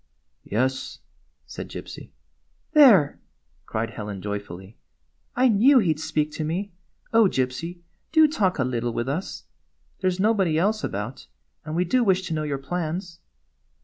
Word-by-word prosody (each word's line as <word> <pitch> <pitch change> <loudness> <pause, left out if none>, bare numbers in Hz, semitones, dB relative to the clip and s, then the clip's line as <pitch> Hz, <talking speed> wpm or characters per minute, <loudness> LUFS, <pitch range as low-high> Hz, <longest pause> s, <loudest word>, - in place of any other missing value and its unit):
"Yes," 130 +5 -1 0.5
said - - -8
Gypsy. - - -9 0.3
" - - -44
There! 220 - +6 0.2
" 65 +5 -41
cried 110 0 -3
Helen 105 -3 -6
joyfully. 100 -1 -6 0.3
" 75 - -45
I 255 +1 +4
knew 245 +5 +5
he 185 -10 +3
'd 155 - -13
speak 155 -1 -1
to 155 - -4
me! 180 +6 -3 0.4
Oh, 225 -1 +6
Gypsy, 165 +3 -2 0.3
do 315 -1 +6
talk 200 - 0
a 130 - +1
little 120 -2 -2
with 120 +2 -2
us! 160 +8 -4 0.6
There 185 - +1
's 180 0 -4
nobody 195 -6 +2
else 210 +5 +1
about, 105 - -5 0.4
and 155 +1 -5
we 180 +2 +1
do 250 +7 +2
wish 190 -3 +2
to 175 - -4
know 155 - -1
your 145 -2 -2
plans." 170 +4 -4
160 Hz, 165 wpm, -24 LUFS, 125-195 Hz, 0.6 s, There